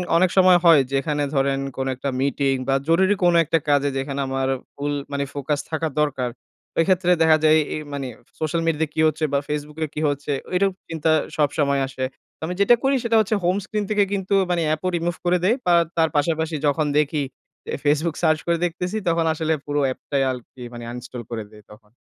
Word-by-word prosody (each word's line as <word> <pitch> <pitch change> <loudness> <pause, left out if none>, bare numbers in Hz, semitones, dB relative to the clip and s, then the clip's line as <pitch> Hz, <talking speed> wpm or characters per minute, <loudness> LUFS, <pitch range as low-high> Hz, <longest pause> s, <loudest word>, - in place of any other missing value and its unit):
অনেক 180 +2 +4
সময় 185 -1 +7
হয় 165 -3 +8
যেখানে 145 +2 0
ধরেন 135 0 +1 0.2
কোনো 135 0 -1
একটা 135 +2 -3
মিটিং 140 0 +1
বা, 135 - +2
জরুরি 190 +4 +4
কোনো 175 -1 +5
একটা 165 +2 +2
কাজে 145 0 +3
যেখানে 135 +1 -3
আমার 135 0 -1 0.3
ফুল 145 +1 -2 0.2
মানে 140 0 -1
ফোকাস 145 +1 -2
থাকা 160 0 -1
দরকার, 135 -4 0 0.5
ওইক্ষেত্রে 180 +1 +3
দেখা 160 -1 +6
যায় 155 0 +6 0.2
এই 155 - -4
মানে 140 -2 -3 0.3
সোশ্যাল 160 +1 -1
মিডিয়াতে 160 -1 +1
কি - - -4
হচ্ছে 155 +1 -2
বা, 140 - +3
ফেসবুকে 150 +1 -3
কী 150 - -3
হচ্ছে? 145 +1 -3 0.2
ওইরকম 190 +1 +2 0.2
চিন্তা 160 -1 0 0.3
সবসময় 140 -2 +1
আসে। 130 -1 -5 0.3
তো - - -70
আমি 180 - -3
যেটা 220 +4 +6
করি 270 +1 +3
সেটা 230 -1 +1
হচ্ছে 215 0 +1
home 180 +3 +2
screen 210 0 -2
থেকে 210 -1 +3
কিন্তু 195 0 -2 0.2
মানে 175 -1 +1
অ্যাপও 155 +4 0
রিমুভ 170 +1 -2
করে 180 +1 +3
দেই 210 +6 +4
বা, 175 - +4 0.2
তার 160 -1 +3
পাশাপাশি 160 +1 0
যখন 150 +2 +1
দেখি 150 0 +1 0.4
যে, - - -6
Facebook 155 +2 +1
সার্চ 155 -1 +3
করে 170 0 +2
দেখতেছি, 180 +4 -3
তখন 165 -1 +2
আসলে 160 0 0
পুরো 145 0 -1
অ্যাপটাই 135 +1 -2
আরকি 125 0 -10
মানে 120 0 -8
uninstall 125 0 -7
করে 110 -2 -3
দেই 105 0 -15
তখন। 105 0 -17
155 Hz, 195 wpm, -22 LUFS, 140-170 Hz, 0.5 s, হয়